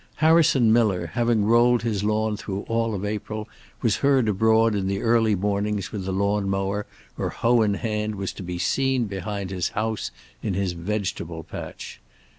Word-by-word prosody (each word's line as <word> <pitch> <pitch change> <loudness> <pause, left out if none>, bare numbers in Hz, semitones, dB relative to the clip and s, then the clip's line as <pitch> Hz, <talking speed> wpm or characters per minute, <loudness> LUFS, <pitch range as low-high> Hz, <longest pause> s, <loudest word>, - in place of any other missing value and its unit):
Harrison 155 -8 +4
Miller, 95 -8 +2
having 115 -3 +2
rolled 120 +2 +4
his 105 -4 -1
lawn 110 0 +1
through 100 -1 -4
all 115 -1 -1
of 100 +1 -4
April, 105 +1 -4 0.4
was 115 -5 +2
heard 135 -4 +3
abroad 110 +2 +3
in 100 -2 -1
the 100 0 -1
early 115 -2 +3
mornings 100 +1 -1
with 100 -3 -4
the 95 - -2
lawn 100 +1 0
mower 95 +1 -1 0.3
or - - -1
hoe 120 0 +2
in 105 -2 +2
hand 105 0 -2
was 100 -1 -4
to - - -9
be 90 -1 -4
seen 130 +7 +1
behind 100 -1 -4
his 90 -3 -1
house 110 0 -1 0.3
in 100 -4 -2
his 95 -1 0
vegetable 85 -2 -3
patch. - - -8
105 Hz, 175 wpm, -24 LUFS, 100-115 Hz, 0.4 s, Harrison